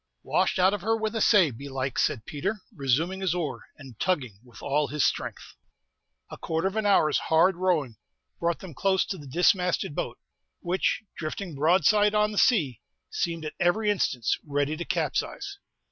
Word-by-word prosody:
"Washed - - +1
out 185 +2 +4
of 205 - -3
her 225 +4 +1
with 220 0 -3
a 225 - -1
say, 190 -10 +5
belike," 135 +1 -4
said 110 -6 0
Peter, 150 +8 -2 0.2
resuming 155 +6 0
his 185 -3 0
oar, 170 -4 -4
and 135 -7 -13
tugging 130 - -1
with 120 -2 -15
all 145 +1 0
his 150 0 0
strength. - - -3 0.8
A - - -9
quarter 165 +3 -1
of 195 - -4
an 220 -1 0
hour's 160 -6 +4
hard 170 +4 +4
rowing 165 - 0 0.4
brought 170 0 0
them 185 -4 -9
close 190 +4 +1
to 195 - -5
the 145 - -11
dismasted 180 +2 +2
boat, - - -4 0.4
which, 185 +5 0
drifting 165 +3 -5
broadside 185 +8 +3
on 210 0 +3
the 210 - 0
sea, 150 - +2 0.3
seemed 165 -2 -2
at 155 - -5
every 210 +5 +2
instant 130 - -1 0.2
ready 145 +1 -1
to 170 +2 -5
capsize. 400 0 -2
170 Hz, 175 wpm, -27 LUFS, 145-195 Hz, 0.8 s, say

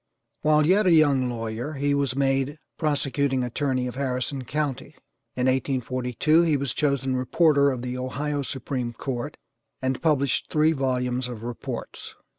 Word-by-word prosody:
While 150 0 +4
yet 190 +4 +4
a - - +5
young 145 -6 +4
lawyer 115 +4 -4
he 145 0 0
was 140 -3 0
made 135 +1 +1 0.2
prosecuting 140 -3 0
attorney 130 +1 -1
of 125 - -4
Harrison 130 0 -2
county. 145 -1 -3 0.4
In 125 - 0
1842 130 +3 +1
he 160 -4 +2
was 140 -3 -2
chosen 135 -3 0
reporter 140 +2 +3
of 125 -3 -3
the 125 0 -3
Ohio 145 +3 -2
Supreme 130 -2 -3
Court, 120 0 -4 0.4
and 130 0 -2
published 140 -5 +1
three 155 +1 +3
volumes 125 -3 -1
of 120 -3 -7
reports. 120 0 -6
135 Hz, 145 wpm, -25 LUFS, 125-145 Hz, 0.4 s, a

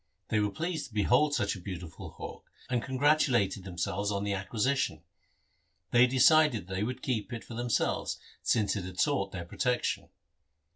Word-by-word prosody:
They 110 - +2
were 105 0 +2
pleased 165 - -3
to 115 - -20
behold 125 +8 +3
such 100 -3 0
a - - -8
beautiful 90 -3 -7
hawk, - - -9 0.2
and 120 -2 +2
congratulated 130 -7 +2
themselves 95 +2 -2
on 100 -1 -1
the 100 -1 0
acquisition. 105 - -1 0.9
They 120 +1 +6
decided 130 - +5
that 95 - -7
they 95 - -1
would 125 +3 -4
keep 115 -3 -2
it 115 -1 -5
for - - -10
themselves 120 0 0 0.2
since 105 -3 +2
it 100 - -3
had 90 0 -7
sought 95 0 +1
their 90 -2 -5
protection. 125 +7 -1
110 Hz, 165 wpm, -30 LUFS, 95-130 Hz, 0.9 s, They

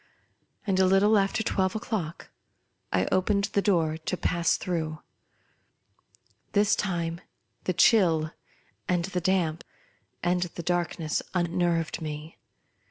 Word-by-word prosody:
And, 190 -3 +1
a 190 - +5
little 195 +3 +4
after 200 +2 +2
twelve 190 -2 0
o'clock, 200 -7 -4 0.6
I 90 - +2
opened 200 +2 +1
the 200 - +3
door 165 -6 +2
to 170 +3 -3
pass 170 -1 +1
through. 160 -3 -3 1.5
This 205 +1 +4
time 170 -3 -2 0.4
the 185 - +1
chill, 165 -4 +4 0.6
and 175 -2 +1
the 185 -1 -3
damp, 175 -3 +1 0.6
and 180 0 +2
the 175 -1 -4
darkness 170 -2 -1
unnerved 175 -1 0
me. 155 +1 -6
175 Hz, 115 wpm, -27 LUFS, 165-195 Hz, 1.5 s, a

